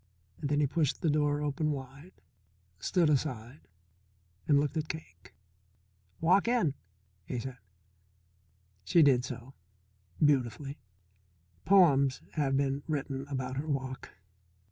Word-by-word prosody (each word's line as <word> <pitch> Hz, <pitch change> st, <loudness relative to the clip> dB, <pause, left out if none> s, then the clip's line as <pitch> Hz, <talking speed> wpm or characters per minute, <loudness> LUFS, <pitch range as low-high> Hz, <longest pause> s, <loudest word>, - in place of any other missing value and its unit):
Then 145 Hz, 0 st, 0 dB
he -, -, +4 dB
pushed 145 Hz, 0 st, 0 dB
the 160 Hz, -, +3 dB
door 145 Hz, 0 st, +1 dB
open 150 Hz, +1 st, -1 dB
wide, 140 Hz, +4 st, -7 dB, 0.6 s
stood 175 Hz, -, +2 dB
aside, 135 Hz, -2 st, -2 dB, 0.8 s
and 145 Hz, -1 st, +5 dB
looked 145 Hz, +2 st, -1 dB
at 155 Hz, -1 st, -2 dB
Cake. 95 Hz, -, -9 dB, 0.8 s
"Walk 185 Hz, +6 st, +3 dB
in," 235 Hz, -, +2 dB, 0.5 s
he 125 Hz, -, -3 dB
said. 125 Hz, +1 st, -6 dB, 1.2 s
She 165 Hz, -, +5 dB
did 130 Hz, -4 st, +4 dB
so. 125 Hz, +1 st, -7 dB, 0.7 s
Beautifully. 140 Hz, 0 st, +1 dB, 0.9 s
Poems 140 Hz, -9 st, +4 dB
have 135 Hz, -3 st, 0 dB
been 140 Hz, 0 st, 0 dB
written 140 Hz, -3 st, -3 dB
about 130 Hz, -2 st, -4 dB
her 150 Hz, +3 st, -3 dB
walk. 130 Hz, -3 st, -3 dB
140 Hz, 115 wpm, -30 LUFS, 130-155 Hz, 1.2 s, and